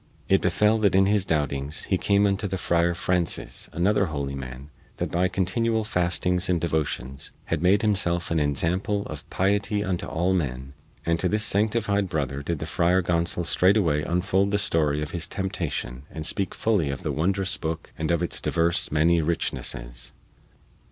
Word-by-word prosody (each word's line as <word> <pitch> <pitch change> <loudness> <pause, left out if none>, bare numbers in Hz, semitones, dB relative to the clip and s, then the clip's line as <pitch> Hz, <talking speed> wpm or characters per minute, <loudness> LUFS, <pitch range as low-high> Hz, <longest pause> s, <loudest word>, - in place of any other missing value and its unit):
It - - +3
befell 105 +1 +2
that 100 -3 +3
in 95 0 +5
his 100 -1 +2
doubtings 75 -2 -1
he 95 - 0
came 100 0 +3
unto 100 +1 0
the 95 0 -3
Friar 85 -1 +1
Francis, 90 -1 -1
another 100 +3 +2
holy 70 -3 -3
man 65 +1 -8 0.3
that - - -3
by 90 +2 +2
continual 110 +5 0
fastings 90 -2 +1
and 90 -2 +2
devotions 75 -5 -2 0.2
had 80 - -1
made 95 +4 +3
himself 90 -6 +1
an 80 - +2
ensample 90 +8 0
of 75 -3 -9
piety 100 +2 0
unto 95 -3 -2
all 90 +3 0
men, 65 -6 -3 0.3
and 85 0 +1
to 90 - +1
this 105 +2 +2
sanctified 105 -2 +2
brother 70 -3 -2
did 85 +3 -2
the - - -5
Friar 90 +2 +2
Gonsol 85 0 0
straightway 90 -4 +3
unfold 90 +4 +1
the 105 - +1
story 75 -6 +1
of 75 - -6
his 85 -1 -2
temptation 75 -9 -4
and 80 -1 -6
speak 95 +2 -1
fully 100 -10 +1
of 70 - -4
the - - -1
wondrous 95 +4 0
booke 80 0 -5
and 80 - -3
of 85 0 +1
its 85 - 0
divers 85 +1 +2
many 80 +2 +3
richnesses. - - -2
85 Hz, 170 wpm, -25 LUFS, 75-95 Hz, 0.3 s, in